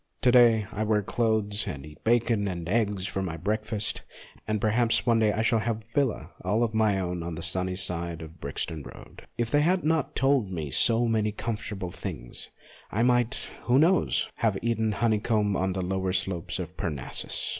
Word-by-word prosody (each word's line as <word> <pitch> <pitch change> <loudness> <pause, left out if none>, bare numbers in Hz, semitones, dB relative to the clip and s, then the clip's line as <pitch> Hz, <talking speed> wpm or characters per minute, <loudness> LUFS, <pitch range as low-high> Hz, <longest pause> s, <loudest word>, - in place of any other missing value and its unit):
To 125 - +5
day 120 -3 +6
I 105 - -2
wear 105 -1 +1
clothes 110 -1 0
and 70 -1 -5
eat 75 0 -14
bacon 115 -2 +2
and 85 -3 -4
eggs 100 -2 0
for 95 - -3
my 85 -4 -3
breakfast, 105 +4 -2 0.5
and 110 0 0
perhaps 115 +2 +2
one 115 -2 +3
day 110 -1 +3
I 110 +2 -1
shall 115 0 +3
have 110 +1 -1
a - - -28
villa 140 -6 +2
ON - - -8
FACTS 80 - -14
45 90 - -3
all 110 +3 +3
of 115 -2 -1
my 110 -3 +2
own 90 -2 -3
on 85 0 -4
the 85 - -5
sunny 90 +2 +1
side 85 -3 -1
of 80 - -9
the 85 - -23
Brixton 75 +2 -3
Road. - - -13
If 115 -1 -1
they 145 - +4
had 180 +4 +2
not 160 -2 0
told 135 -6 +2
me 80 -6 -4
so 115 - +3
many 110 -2 +1
comfortable 105 -4 -4
things, - - -7 0.4
I 110 +4 +1
might 120 0 +2
who 125 +1 +4
knows? 170 +5 +3
have 110 -4 +1
eaten 110 -2 +1
honeycomb 105 -2 +1
on 95 0 0
the 95 -1 -2
lower 95 0 -1
slopes 90 -2 0
of - - -6
Parnassus. 75 -6 -2
105 Hz, 205 wpm, -27 LUFS, 90-115 Hz, 0.5 s, day